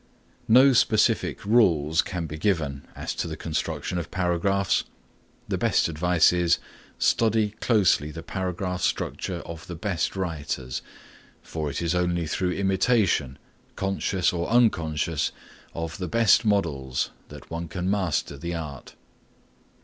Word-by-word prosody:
No 130 Hz, +4 st, +7 dB
specific 110 Hz, -2 st, +2 dB
rules 85 Hz, -8 st, +4 dB
can 90 Hz, -3 st, -4 dB
be 75 Hz, -, -6 dB
given 80 Hz, -8 st, -1 dB
as -, -, -4 dB
to -, -, -3 dB
the 80 Hz, -1 st, -5 dB
construction 80 Hz, +3 st, -3 dB
of 85 Hz, -, -6 dB
paragraphs. 95 Hz, +1 st, +1 dB, 0.6 s
The -, -, -2 dB
best -, -, +2 dB
advice 85 Hz, +1 st, +3 dB
is, 85 Hz, -1 st, +3 dB, 0.4 s
Study 110 Hz, -2 st, +2 dB
closely 100 Hz, -, +3 dB
the 80 Hz, +2 st, -8 dB
paragraph 90 Hz, -1 st, -3 dB
structure 90 Hz, -2 st, -2 dB
of 85 Hz, 0 st, -9 dB
the 90 Hz, -, -6 dB
best 85 Hz, +1 st, -2 dB
writers, 75 Hz, -8 st, -3 dB, 0.6 s
for 80 Hz, -2 st, -4 dB
it 70 Hz, +5 st, -3 dB
is 85 Hz, 0 st, +1 dB
only 90 Hz, -1 st, 0 dB
through 90 Hz, +3 st, -1 dB
imitation, 95 Hz, -, +1 dB, 0.4 s
conscious 95 Hz, -2 st, 0 dB
or 85 Hz, -1 st, -2 dB
unconscious 85 Hz, -10 st, +2 dB, 0.4 s
of 80 Hz, +2 st, -5 dB
the 90 Hz, -, -3 dB
best 115 Hz, +4 st, +4 dB
models, 75 Hz, -, 0 dB, 0.2 s
that -, -, -12 dB
one 85 Hz, +1 st, -4 dB
can 90 Hz, +3 st, -4 dB
master 95 Hz, -7 st, 0 dB
the 85 Hz, +3 st, -4 dB
art. 75 Hz, -5 st, -7 dB
90 Hz, 135 wpm, -25 LUFS, 80-100 Hz, 0.6 s, No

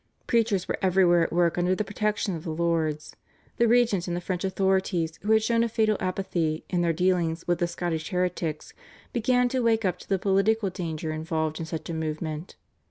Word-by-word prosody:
Preachers 225 Hz, -6 st, +1 dB
were -, -, -2 dB
everywhere 180 Hz, -2 st, +4 dB
at 165 Hz, -, 0 dB
work 175 Hz, 0 st, +2 dB
under 180 Hz, +1 st, +2 dB
the 215 Hz, -, -1 dB
protection 205 Hz, -1 st, -1 dB
of 160 Hz, -, -7 dB
the -, -, -5 dB
lords. 160 Hz, -2 st, -1 dB, 0.4 s
The 235 Hz, -, +4 dB
regent 225 Hz, -6 st, +3 dB
and 175 Hz, 0 st, -2 dB
the -, -, -4 dB
French 180 Hz, 0 st, -3 dB
authorities, 190 Hz, -4 st, 0 dB
who 210 Hz, -, -1 dB
had 220 Hz, 0 st, +5 dB
shown 230 Hz, +1 st, +2 dB
a 235 Hz, -, 0 dB
fatal 215 Hz, -1 st, +2 dB
apathy 175 Hz, -4 st, -2 dB
in 175 Hz, -2 st, +1 dB
their 170 Hz, -1 st, +2 dB
dealings 170 Hz, -1 st, 0 dB
with 175 Hz, 0 st, +1 dB
Scottish 170 Hz, -2 st, -3 dB
heretics, 180 Hz, -4 st, -2 dB, 0.4 s
began 250 Hz, +1 st, +2 dB
to 260 Hz, -, -1 dB
wake 225 Hz, -2 st, +2 dB
up 185 Hz, -, 0 dB
to -, -, -14 dB
the 195 Hz, -, +2 dB
political 195 Hz, +2 st, +2 dB
danger 160 Hz, -3 st, -4 dB
involved 160 Hz, 0 st, -2 dB
in 165 Hz, -, -4 dB
such 160 Hz, 0 st, -5 dB
a 170 Hz, -, -4 dB
movement. 155 Hz, +1 st, -4 dB
180 Hz, 195 wpm, -26 LUFS, 165-205 Hz, 0.4 s, had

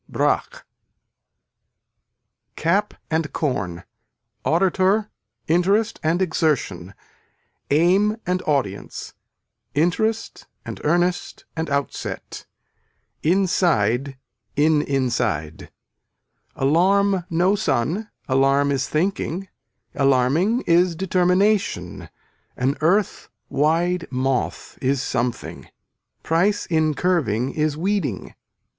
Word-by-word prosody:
BRAQUE -, -, -1 dB, 1.9 s
Cap 195 Hz, +6 st, 0 dB, 0.2 s
and 160 Hz, -1 st, 0 dB
corn, 100 Hz, -, -2 dB, 0.6 s
auditor, 190 Hz, +4 st, +2 dB, 0.4 s
interest 195 Hz, +7 st, +2 dB
and 165 Hz, +4 st, +1 dB
exertion, 135 Hz, -, -1 dB, 0.7 s
aim 185 Hz, +8 st, +3 dB
and 180 Hz, +1 st, 0 dB
audience, 130 Hz, -10 st, -2 dB, 0.6 s
interest 220 Hz, +9 st, 0 dB, 0.2 s
and -, -, -7 dB
earnest 175 Hz, +3 st, 0 dB
and 160 Hz, -1 st, -3 dB
outset, 140 Hz, 0 st, -4 dB, 0.7 s
inside 140 Hz, -, +1 dB, 0.4 s
in 150 Hz, +1 st, +3 dB
inside. 120 Hz, -, -1 dB, 0.9 s
Alarm 185 Hz, +6 st, +3 dB
no 175 Hz, +3 st, +2 dB
sun, 170 Hz, -, -1 dB, 0.2 s
alarm 135 Hz, +1 st, +3 dB
is 135 Hz, 0 st, -1 dB
thinking, 185 Hz, +2 st, -1 dB, 0.4 s
alarming 140 Hz, -, +2 dB
is 170 Hz, -2 st, +3 dB
determination 185 Hz, -, +1 dB, 0.5 s
an 130 Hz, +3 st, +1 dB
earth 185 Hz, +5 st, +1 dB, 0.2 s
wide 170 Hz, +4 st, +1 dB
moth 130 Hz, 0 st, -2 dB
is 135 Hz, +1 st, +1 dB
something. 120 Hz, -2 st, -3 dB, 0.5 s
Price 185 Hz, +6 st, +1 dB
in 155 Hz, -3 st, +1 dB
curving 135 Hz, -, 0 dB
is 150 Hz, -1 st, 0 dB
weeding. 175 Hz, -, -2 dB
160 Hz, 80 wpm, -22 LUFS, 135-185 Hz, 1.9 s, aim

